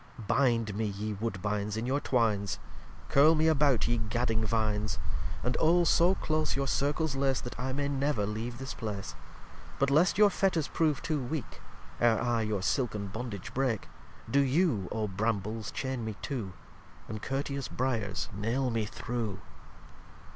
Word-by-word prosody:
lxxvii 110 Hz, -, -8 dB
Bind 115 Hz, -6 st, +2 dB
me 110 Hz, +1 st, 0 dB
ye 105 Hz, +1 st, -3 dB
Woodbines 105 Hz, 0 st, -2 dB
in 115 Hz, -, -2 dB
your 135 Hz, +3 st, +1 dB
'twines, 110 Hz, -7 st, +1 dB, 0.5 s
Curle 150 Hz, +4 st, +6 dB
me 160 Hz, +1 st, +3 dB
about 145 Hz, -5 st, +3 dB
ye 120 Hz, 0 st, +1 dB
gadding 115 Hz, 0 st, 0 dB
Vines, 105 Hz, -2 st, 0 dB, 0.5 s
And 125 Hz, 0 st, 0 dB
Oh 170 Hz, +2 st, +5 dB
so 175 Hz, +2 st, +4 dB
close 155 Hz, -1 st, 0 dB
your 140 Hz, 0 st, 0 dB
Circles 145 Hz, +2 st, 0 dB
lace, 135 Hz, -1 st, +1 dB
That 120 Hz, -, -7 dB
I 130 Hz, +1 st, -1 dB
may 140 Hz, +2 st, -1 dB
never 140 Hz, -5 st, 0 dB
leave 110 Hz, +3 st, -4 dB
this 135 Hz, +1 st, -5 dB
Place: 105 Hz, -4 st, -5 dB, 0.6 s
But, 140 Hz, 0 st, +2 dB
lest 170 Hz, +6 st, +4 dB
your 210 Hz, -1 st, +6 dB
Fetters 180 Hz, -7 st, +1 dB
prove 155 Hz, -4 st, +1 dB
too 155 Hz, -3 st, 0 dB
weak, 130 Hz, +1 st, -5 dB, 0.4 s
Ere 115 Hz, -2 st, +4 dB
I 120 Hz, -2 st, +1 dB
your 105 Hz, -3 st, -1 dB
Silken 105 Hz, -3 st, 0 dB
Bondage 110 Hz, -2 st, -6 dB
break, 130 Hz, -5 st, 0 dB, 0.4 s
Do 140 Hz, -, +3 dB
you, 140 Hz, -, +2 dB
O 110 Hz, -1 st, -1 dB
Brambles, 105 Hz, +1 st, -2 dB
chain 130 Hz, -3 st, -3 dB
me 110 Hz, -1 st, -4 dB
too, 115 Hz, -10 st, -3 dB, 0.5 s
And 110 Hz, -1 st, -5 dB
courteous 140 Hz, +1 st, -2 dB
Briars 115 Hz, -6 st, -1 dB
nail 120 Hz, +5 st, 0 dB
me 110 Hz, -2 st, -1 dB, 0.2 s
though. 115 Hz, -5 st, -1 dB
120 Hz, 160 wpm, -30 LUFS, 105-140 Hz, 0.6 s, Curle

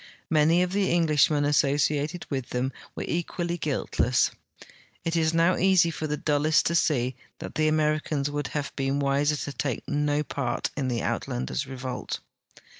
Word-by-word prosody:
Many 160 Hz, +3 st, +4 dB
of 180 Hz, -, -2 dB
the 195 Hz, 0 st, +1 dB
Englishmen 150 Hz, -3 st, +3 dB
asso 145 Hz, -1 st, +3 dB
ciated 150 Hz, +3 st, 0 dB
with 130 Hz, -3 st, -3 dB
them 125 Hz, +2 st, -1 dB, 0.2 s
were -, -, -4 dB
equally 175 Hz, 0 st, -2 dB
guiltle.ss. 130 Hz, -5 st, +1 dB, 0.7 s
It 165 Hz, 0 st, 0 dB
is 160 Hz, -1 st, +2 dB
now 165 Hz, +2 st, +3 dB
easy 185 Hz, -2 st, +4 dB
for 155 Hz, 0 st, -4 dB
the 150 Hz, 0 st, -2 dB
dullest 150 Hz, +1 st, +2 dB
to 170 Hz, -, +1 dB
see 130 Hz, -6 st, +1 dB, 0.2 s
that -, -, -7 dB
the 155 Hz, 0 st, +1 dB
Americans 155 Hz, -2 st, +1 dB
would 145 Hz, -1 st, -2 dB
have 145 Hz, -1 st, -4 dB
l>een 135 Hz, 0 st, 0 dB
wiser 140 Hz, +2 st, +2 dB
to 145 Hz, 0 st, -5 dB
take 130 Hz, -2 st, -3 dB
no 145 Hz, 0 st, +1 dB
part 125 Hz, -4 st, -2 dB
in 140 Hz, -3 st, -1 dB
the 120 Hz, -2 st, -1 dB
Uitlanders' 65 Hz, +1 st, -2 dB
revolt. 130 Hz, -1 st, -5 dB
150 Hz, 165 wpm, -26 LUFS, 140-160 Hz, 0.7 s, Many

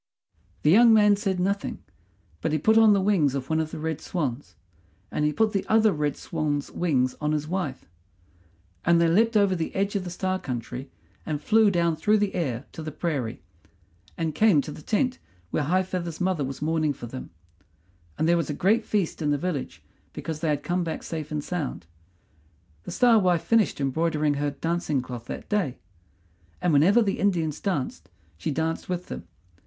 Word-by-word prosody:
The 150 Hz, -, +5 dB
young 225 Hz, +3 st, +7 dB
man 210 Hz, -1 st, +6 dB
said 195 Hz, -3 st, -1 dB
nothing; 200 Hz, +2 st, -1 dB, 0.6 s
but -, -, -1 dB
he 155 Hz, -, +2 dB
put 220 Hz, +9 st, +3 dB
on 225 Hz, -1 st, +7 dB
the 200 Hz, -, +3 dB
wings 175 Hz, -9 st, +2 dB
of 135 Hz, +2 st, -4 dB
one 160 Hz, -, +2 dB
of 160 Hz, -1 st, -1 dB
the -, -, -7 dB
red 160 Hz, -1 st, -3 dB
swans, 145 Hz, -6 st, -3 dB, 0.6 s
and 150 Hz, -, -1 dB
he 150 Hz, -, +2 dB
put 220 Hz, +6 st, +1 dB
the 195 Hz, -, 0 dB
other 220 Hz, -1 st, +4 dB
red 150 Hz, -2 st, -1 dB
swan's 150 Hz, -3 st, -2 dB
wings 130 Hz, -7 st, +1 dB
on 150 Hz, 0 st, 0 dB
his 150 Hz, 0 st, -1 dB
wife, 175 Hz, -6 st, -3 dB, 1.0 s
and 170 Hz, 0 st, +4 dB
they 170 Hz, -, +4 dB
leapt 220 Hz, +7 st, +3 dB
over 200 Hz, -2 st, +3 dB
the 165 Hz, -2 st, -3 dB
edge 200 Hz, +1 st, 0 dB
of 195 Hz, -, 0 dB
the 180 Hz, -, -5 dB
Star 185 Hz, +1 st, -2 dB
country 125 Hz, 0 st, -5 dB, 0.3 s
and 150 Hz, -2 st, -3 dB
flew 220 Hz, +5 st, +4 dB
down 170 Hz, -3 st, +1 dB
through 210 Hz, +7 st, +2 dB
the 205 Hz, -1 st, 0 dB
air 135 Hz, -7 st, -2 dB
to -, -, -8 dB
the 155 Hz, 0 st, -5 dB
prairie, 145 Hz, -7 st, -3 dB, 0.7 s
and 160 Hz, -2 st, -1 dB
came 200 Hz, -1 st, +4 dB
to 150 Hz, -, -7 dB
the 150 Hz, -, -10 dB
tent 250 Hz, -, 0 dB, 0.3 s
where -, -, 0 dB
High 185 Hz, +5 st, +2 dB
feather's 175 Hz, -3 st, -4 dB
mother 180 Hz, -5 st, 0 dB
was 135 Hz, +2 st, -5 dB
mourning 155 Hz, -1 st, +1 dB
for 125 Hz, -, -9 dB
them; 130 Hz, +2 st, -8 dB, 0.9 s
and 160 Hz, -, +1 dB
there 170 Hz, 0 st, +4 dB
was 165 Hz, -3 st, -2 dB
a 150 Hz, -, -2 dB
great 215 Hz, +8 st, +2 dB
feast 205 Hz, -6 st, -1 dB
in 150 Hz, -, 0 dB
the 145 Hz, -, +2 dB
village 155 Hz, -3 st, -4 dB, 0.3 s
because 160 Hz, -2 st, -5 dB
they 160 Hz, -, -1 dB
had 145 Hz, -1 st, 0 dB
come 175 Hz, 0 st, 0 dB
back 165 Hz, -, -4 dB
safe 155 Hz, -2 st, -5 dB
and 150 Hz, -1 st, -3 dB
sound. 145 Hz, -, -4 dB, 1.0 s
The -, -, -6 dB
Star 240 Hz, -3 st, +5 dB
wife 180 Hz, -4 st, +2 dB
finished 225 Hz, -8 st, +2 dB
embroidering 150 Hz, +2 st, +1 dB
her 145 Hz, +1 st, -1 dB
dancing 155 Hz, -1 st, -1 dB
cloth 120 Hz, -2 st, -7 dB
that -, -, -7 dB
day; 190 Hz, -, 0 dB, 0.8 s
and 175 Hz, -, +1 dB
whenever 190 Hz, +11 st, +5 dB
the 200 Hz, -2 st, -1 dB
Indians 165 Hz, -7 st, 0 dB
danced 130 Hz, -, -3 dB, 0.3 s
she 85 Hz, -, -4 dB
danced 160 Hz, +4 st, -2 dB
with 180 Hz, 0 st, -2 dB
them. 85 Hz, -, -8 dB
165 Hz, 195 wpm, -26 LUFS, 145-195 Hz, 1.0 s, young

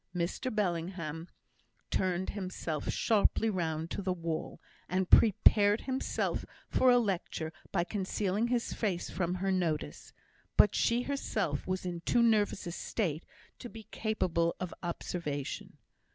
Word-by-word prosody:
Mr 175 Hz, +9 st, -1 dB
Bellingham 170 Hz, -5 st, -2 dB, 0.6 s
turned 185 Hz, 0 st, 0 dB
himself 185 Hz, -6 st, -4 dB
sharply 220 Hz, 0 st, +2 dB
round 165 Hz, -3 st, -2 dB
to -, -, -3 dB
the 190 Hz, -1 st, -1 dB
wall, 165 Hz, -2 st, -4 dB, 0.3 s
and 185 Hz, 0 st, 0 dB
prepared 205 Hz, 0 st, +6 dB
himself 265 Hz, 0 st, -1 dB, 0.3 s
for 260 Hz, -, +4 dB
a 245 Hz, -, +7 dB
lecture 180 Hz, -7 st, -1 dB, 0.2 s
by 175 Hz, -4 st, +2 dB
concealing 200 Hz, +3 st, -1 dB
his 240 Hz, -1 st, 0 dB
face 190 Hz, -6 st, -2 dB
from 180 Hz, -1 st, -1 dB
her 195 Hz, +1 st, 0 dB
notice; 160 Hz, -, -2 dB, 0.5 s
but 210 Hz, -, +7 dB
she 235 Hz, +1 st, +2 dB
herself 215 Hz, -, -2 dB
was 185 Hz, 0 st, -2 dB
in 175 Hz, -1 st, -3 dB
too 235 Hz, +7 st, +3 dB
nervous 210 Hz, -3 st, +2 dB
a 170 Hz, -, -3 dB
state 170 Hz, -3 st, -2 dB, 0.3 s
to 240 Hz, -, -7 dB
be 225 Hz, -1 st, -10 dB
capable 170 Hz, -6 st, 0 dB
of 180 Hz, -1 st, -4 dB
observation. 170 Hz, -5 st, -4 dB
185 Hz, 135 wpm, -32 LUFS, 170-215 Hz, 0.6 s, a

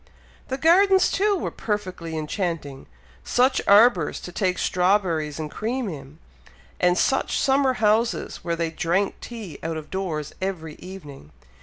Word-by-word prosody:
The 265 Hz, -, -3 dB
gardens, 375 Hz, +5 st, +5 dB
too, 410 Hz, +1 st, +2 dB
were 365 Hz, -, -3 dB
perfectly 185 Hz, -6 st, -4 dB
enchanting. 155 Hz, -4 st, -4 dB, 0.4 s
Such 255 Hz, +2 st, +2 dB
arbours 200 Hz, -5 st, +5 dB
to 180 Hz, -, -8 dB
take 185 Hz, 0 st, 0 dB
strawberries 180 Hz, -5 st, +1 dB
and 155 Hz, -2 st, -5 dB
cream 240 Hz, +2 st, -2 dB
in! 145 Hz, -4 st, -8 dB, 0.6 s
and 180 Hz, 0 st, +3 dB
such 270 Hz, -, +1 dB
summer 270 Hz, -1 st, +3 dB
houses, 225 Hz, +1 st, +1 dB
where 170 Hz, -1 st, -3 dB
they 165 Hz, -1 st, -2 dB
drank 175 Hz, +5 st, -1 dB
tea 220 Hz, -8 st, -8 dB
out 165 Hz, 0 st, -3 dB
of 155 Hz, -, -9 dB
doors 165 Hz, -6 st, -3 dB
every 170 Hz, -5 st, -4 dB
evening! 150 Hz, -, -11 dB
185 Hz, 140 wpm, -24 LUFS, 160-230 Hz, 0.6 s, gardens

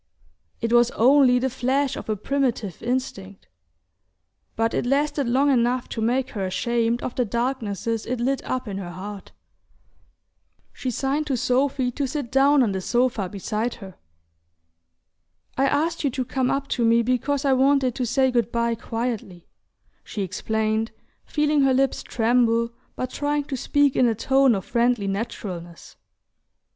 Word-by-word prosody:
It 230 Hz, +1 st, -1 dB
was 240 Hz, 0 st, +5 dB
only 255 Hz, +1 st, +5 dB
the 255 Hz, +1 st, +1 dB
flash 265 Hz, +2 st, 0 dB
of -, -, -8 dB
a 215 Hz, -, +1 dB
primitive 235 Hz, -, -2 dB
instinct, 225 Hz, -, -4 dB, 1.1 s
but 225 Hz, 0 st, 0 dB
it -, -, 0 dB
lasted 285 Hz, 0 st, +1 dB
long 275 Hz, +4 st, +3 dB
enough 245 Hz, 0 st, +1 dB
to 225 Hz, -, -4 dB
make 250 Hz, +4 st, 0 dB
her 200 Hz, -, -4 dB
ashamed 230 Hz, +5 st, 0 dB
of 245 Hz, -, -3 dB
the 250 Hz, -, +1 dB
darknesses 230 Hz, -2 st, -2 dB
it 250 Hz, -1 st, -2 dB
lit 265 Hz, +3 st, 0 dB
up 255 Hz, -2 st, -3 dB
in 195 Hz, -1 st, -4 dB
her 180 Hz, -3 st, -6 dB
heart... 195 Hz, +3 st, -8 dB, 1.4 s
She 260 Hz, -, -4 dB
signed 275 Hz, +5 st, -1 dB
to 270 Hz, -3 st, 0 dB
Sophy 255 Hz, +1 st, +1 dB
to 275 Hz, +2 st, -2 dB
sit 275 Hz, -3 st, -4 dB
down 275 Hz, +1 st, +5 dB
on 220 Hz, -, +1 dB
the 190 Hz, -1 st, -3 dB
sofa 235 Hz, -3 st, 0 dB
beside 215 Hz, +4 st, -3 dB
her. 195 Hz, -3 st, -11 dB, 1.6 s
"I 270 Hz, +1 st, +2 dB
asked 320 Hz, +5 st, 0 dB
you 285 Hz, -, +2 dB
to 255 Hz, 0 st, -3 dB
come 260 Hz, 0 st, -1 dB
up 275 Hz, 0 st, -1 dB
to 240 Hz, -, 0 dB
me 230 Hz, +1 st, +4 dB
because 265 Hz, +4 st, 0 dB
I 270 Hz, -, +4 dB
wanted 265 Hz, -1 st, +3 dB
to 250 Hz, -, -2 dB
say 265 Hz, +2 st, +2 dB
good 235 Hz, -1 st, 0 dB
bye 235 Hz, 0 st, +1 dB
quietly," 225 Hz, -6 st, -4 dB, 0.6 s
she 205 Hz, -, -4 dB
explained, 220 Hz, +3 st, -1 dB, 0.3 s
feeling 300 Hz, -1 st, +1 dB
her 270 Hz, -1 st, +3 dB
lips 270 Hz, 0 st, +1 dB
tremble, 235 Hz, 0 st, +1 dB, 0.2 s
but 255 Hz, 0 st, -4 dB
trying 290 Hz, 0 st, -1 dB
to 280 Hz, -1 st, -5 dB
speak 285 Hz, +2 st, +2 dB
in 250 Hz, -, +4 dB
a 225 Hz, -, +1 dB
tone 265 Hz, +1 st, +3 dB
of 190 Hz, -1 st, -4 dB
friendly 235 Hz, -1 st, +1 dB
naturalness. 195 Hz, -5 st, -5 dB
245 Hz, 160 wpm, -24 LUFS, 225-270 Hz, 1.6 s, was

